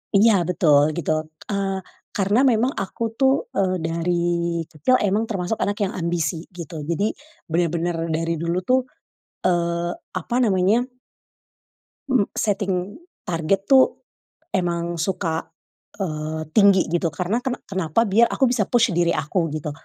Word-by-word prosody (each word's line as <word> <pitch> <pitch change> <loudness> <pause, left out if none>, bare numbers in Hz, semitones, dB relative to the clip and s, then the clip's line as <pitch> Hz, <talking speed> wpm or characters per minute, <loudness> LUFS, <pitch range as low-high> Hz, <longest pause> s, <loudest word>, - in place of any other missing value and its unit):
Iya 220 +2 +6
betul 150 -3 +3
gitu, 165 -2 -1 0.4
eee, 195 -1 -1 0.3
karena 205 +4 +2
memang 245 +2 +3
aku 195 +4 -4 0.2
tuh, 275 - +2
eee, 185 -1 +1
dari 165 +2 -1 0.6
kecil 155 - +2
emang 210 +3 +1
termasuk 195 0 -2
anak 205 - 0
yang 190 - -1
ambisi 170 -1 -2
gitu 170 -3 -8
jadi, 200 +6 +1 0.4
bener-bener 170 0 0
dari 165 0 -1
dulu 170 +1 -1
tuh, 255 +5 +3 0.7
eee, 170 0 0 0.3
apa 240 - -4
namanya. 200 +3 +3 1.3
Mmm, 245 -7 +2
setting 195 -2 -1 0.3
target 180 +4 0
tuh, 265 -1 +5 0.5
emang 170 -2 -1
suka, 165 -2 -1 0.6
eee, 155 -2 -3
tinggi 200 -3 +4
gitu 170 -1 +1
karena 180 +8 -1
kena 250 0 -4
kenapa 190 +1 0
biar 230 +2 +4
aku 265 -3 +1
bisa 220 -6 +1
push 235 -2 +3
diri 170 -1 +2
aku 165 +3 0
gitu, 150 -1 -3
180 Hz, 135 wpm, -22 LUFS, 170-205 Hz, 1.3 s, Iya